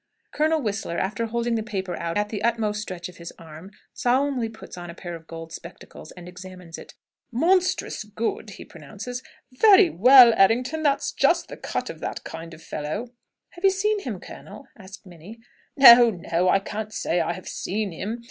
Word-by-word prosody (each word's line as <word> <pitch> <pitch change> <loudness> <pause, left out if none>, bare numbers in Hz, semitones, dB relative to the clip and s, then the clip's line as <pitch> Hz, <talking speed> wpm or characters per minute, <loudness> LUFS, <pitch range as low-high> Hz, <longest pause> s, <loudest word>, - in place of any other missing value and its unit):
Colonel 310 0 +1
Whistler, 205 -5 -3
after 210 +4 -2
holding 235 +1 -2
the 225 - 0
paper 190 -4 -4
out 170 +1 -4
at 210 0 -1
the 210 -2 -5
utmost 215 -3 0
stretch 180 -4 -6
of 180 - -14
his 170 0 -9
arm, 160 +3 -12 0.2
solemnly 260 -2 0
puts 220 0 -12
on 175 -1 -9
a 170 - -9
pair 175 -2 -8
of 165 -1 -13
gold 165 0 -9
spectacles 170 - -11
and 180 -1 -12
examines 180 -2 -11
it. - - -13 0.4
"Monstrous 350 +3 +1
good!" 215 +1 -4
he 200 - -11
pronounces. 205 - -8 0.3
"Very 390 +7 +6
well, 245 +4 +8
Errington! 250 +10 +2
That's 290 -3 +1
just - - +1
the - - -7
cut - - -4
of - - -13
that - - -5
kind 165 +1 -9
of 160 - -17
fellow." 155 +11 -5 0.4
"Have 345 - -15
you 390 - +6
seen 415 +2 0
him, 235 - -6
colonel?" 205 +10 -12
asks 195 -1 -13
Minnie. 180 +5 -13 0.4
"No 240 -3 +9
no; 175 -2 -1
I 195 - +5
can't 215 +2 -6
say 175 -4 -1
I 165 +1 -1
have 185 +1 -11
seen 205 +1 -3
him. 210 +8 -5
210 Hz, 185 wpm, -24 LUFS, 175-245 Hz, 0.4 s, No